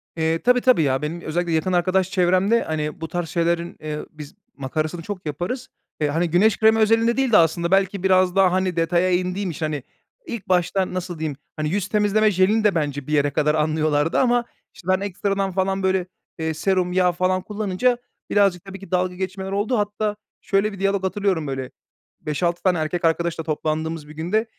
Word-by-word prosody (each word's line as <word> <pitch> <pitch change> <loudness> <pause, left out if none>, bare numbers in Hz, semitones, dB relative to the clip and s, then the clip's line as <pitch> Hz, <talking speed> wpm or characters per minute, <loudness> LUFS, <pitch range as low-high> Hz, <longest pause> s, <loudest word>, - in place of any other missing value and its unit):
Eee, 160 0 0
tabii, 250 0 +3
tabii, 255 -10 +4
ya, 135 -2 +1
benim 160 +3 -4
özellikle 170 +2 -2
yakın 180 +3 0
arkadaş 185 +1 +1
çevremde, 185 +4 +3
hani, 150 0 -3
bu 160 - -3
tarz 175 +1 -3
şeylerin, 170 0 -1
eee, 150 -1 -5
biz 150 -1 -11 0.2
makarasını 155 +5 -3
çok 185 +1 -7
yaparız. 175 - -4 0.3
Eee, 150 - +3
hani, 165 +4 0
güneş 195 +6 +3
kremi 220 0 +4
özelinde 225 +2 +3
değil 265 -3 +1
de 210 - +7
aslında 170 +1 +2
belki 195 0 +2
biraz 185 -1 +3
daha, 190 -2 +5
hani, 185 -1 0
detaya 175 +2 +2
indiğim 180 +1 -1
için 155 0 -3
hani, 150 -4 -3 0.4
ilk 235 -4 -6
başta 185 +1 +1
nasıl 180 -2 -4
diyeyim, 155 -3 -3 0.2
hani, 155 -1 -2
yüz 195 +2 -1
temizleme 210 +1 +2
jelini 200 +4 +2
de 205 -3 +3
bence 145 -4 -2
bir 150 - -3
yere 145 -1 +2
kadar 150 +1 +1
anlıyorlardı 155 0 +1
ama, 245 -2 +2 0.3
işte, 180 - -15
ben 185 0 +3
ekstradan 195 0 -1
falan, 190 +1 -1
böyle, 190 -1 +1 0.3
eee, 160 0 -1
serum, 180 +2 0
yağ 180 -1 +3
falan 185 +1 0
kullanınca 210 +4 0 0.3
birazcık 195 -4 +2
tabii 195 0 -9
ki 195 - -13
dalga 180 0 0
geçmeler 190 +1 -4
oldu. 205 +5 0
Hatta 210 0 -1 0.3
şöyle 200 +1 +1
bir 200 - -9
diyalog 195 0 0
hatırlıyorum, 190 -5 0
böyle, 135 -1 -4 0.5
5-6 170 +3 -1
tane 185 -2 +3
erkek 165 +2 -2
arkadaşla 165 0 0
toplandığımız 155 0 -3
bir 150 - -11
günde, 180 +8 0
180 Hz, 190 wpm, -22 LUFS, 160-195 Hz, 0.5 s, de